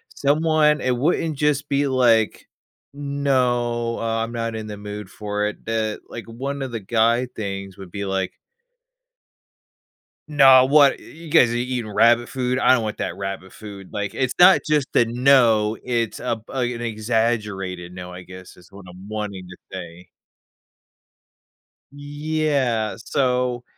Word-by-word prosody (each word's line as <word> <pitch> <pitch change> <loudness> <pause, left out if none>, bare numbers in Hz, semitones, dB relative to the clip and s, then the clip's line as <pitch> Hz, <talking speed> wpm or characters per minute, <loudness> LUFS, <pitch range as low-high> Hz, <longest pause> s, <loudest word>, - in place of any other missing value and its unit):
Someone 150 +1 +2
it 125 -1 +1
wouldn't 155 +2 0
just 150 -1 0
be 140 0 +1
like, 120 -4 +2 0.5
"No, 125 -5 0
uh, 115 0 -1
I'm 115 - -9
not 115 -1 -3
in 110 -1 -6
the 105 - -6
mood 105 -1 -8
for 105 +1 -3
it." 105 - -5
Eh, 110 -1 -1
like, 115 - -8
one 135 +5 -5
of 135 -2 -4
the 115 - -4
guy 115 +4 +2
things 100 -4 -6
would 95 -3 -11
be 100 +2 -5
like 95 -1 -2 1.9
"No, 135 -4 +7
what? 140 0 +5
Y - - -16
You 165 0 -12
guys 125 -7 +5
are - - -2
eating 120 -2 -3
rabbit 115 +3 +4
food? 125 -1 -1
I - - +5
don't 115 -3 +1
want 105 0 -4
that 85 - -4
rabbit 95 -1 -6
food." 100 -3 -11
Like, 105 -1 -4
it's 130 -1 -1
not 180 +2 +8
just 150 -3 +1
a 120 - +5
"no." 115 -3 +3
It's, 115 -3 -2
uh, 125 -2 -1
an 125 -2 -2
exaggerated 105 -5 -2
"no," 90 0 -8
I 90 0 -9
guess, 90 0 -12
is 90 -1 -19
what 100 -1 -13
I'm 90 +2 -13
wanting 105 -4 -5
to 90 - -11 0.2
say. 90 -1 -9 1.9
Yeah, 145 -6 -1
so 125 0 -1
115 Hz, 155 wpm, -22 LUFS, 105-135 Hz, 1.9 s, not